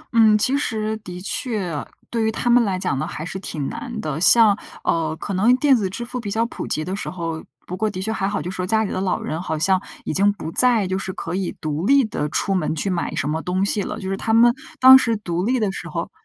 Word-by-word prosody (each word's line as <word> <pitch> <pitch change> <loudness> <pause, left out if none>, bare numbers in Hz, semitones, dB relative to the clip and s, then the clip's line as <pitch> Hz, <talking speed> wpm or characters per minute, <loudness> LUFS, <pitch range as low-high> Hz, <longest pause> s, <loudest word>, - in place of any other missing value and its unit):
嗯， 220 -2 +6
其 255 +6 +2
实 220 -6 -1
的 180 -5 -9
确， 195 - -3 0.3
对 230 -2 0
于 220 - +1
他 240 - -4
们 240 0 +5
来 195 -4 -1
讲 140 -7 -2
呢， 155 - -2
还 155 -2 -6
是 190 +2 -5
挺 150 -7 -4
难 235 -2 -6
的。 155 -2 -4
像， 215 +1 +7 0.3
呃， 160 -1 0
可 200 - -4
能 220 +7 +4
电 275 0 +4
子 205 -6 -1
支 235 +6 -5
付 250 +1 -5
比 210 -4 -5
较 225 +3 0
普 235 - -6
及 155 - -2
的 185 - -3
时 200 - -5
候 165 -3 -5 0.2
不 180 - -6
过 215 +3 -1
的 185 -3 -6
确 220 +4 -2
还 195 -3 -1
好， 205 0 -2
就 180 - -5
说 185 -1 -4
家 220 +1 +2
里 205 - -3
的 - - -2
老 190 -2 0
人， 160 +2 -4
好 160 -3 -3
像 185 +4 +2 0.2
已 - - -2
经 200 +2 +3
不 165 -5 -7
再 240 0 +4
就 190 +1 -2
是 190 - -4
可 165 - -6
以 190 0 -3
独 155 +4 -3
立 275 -3 +5
地 150 -8 -3
出 195 - -1
门 170 -4 -1
去 190 +5 -2
买 175 -2 -2
什 - - -1
么 155 +2 -2
东 185 +3 -1
西 205 0 0
了， 210 +3 -5
就 190 - -6
是 195 - -1
他 220 +3 0
们 235 +1 +6 0.3
当 260 +1 +9
时 230 -4 0
独 175 -3 -3
立 255 +3 +1
的 210 -3 0
时 - - -7
候 - - -4
195 Hz, 290 characters per minute, -21 LUFS, 180-225 Hz, 0.3 s, 当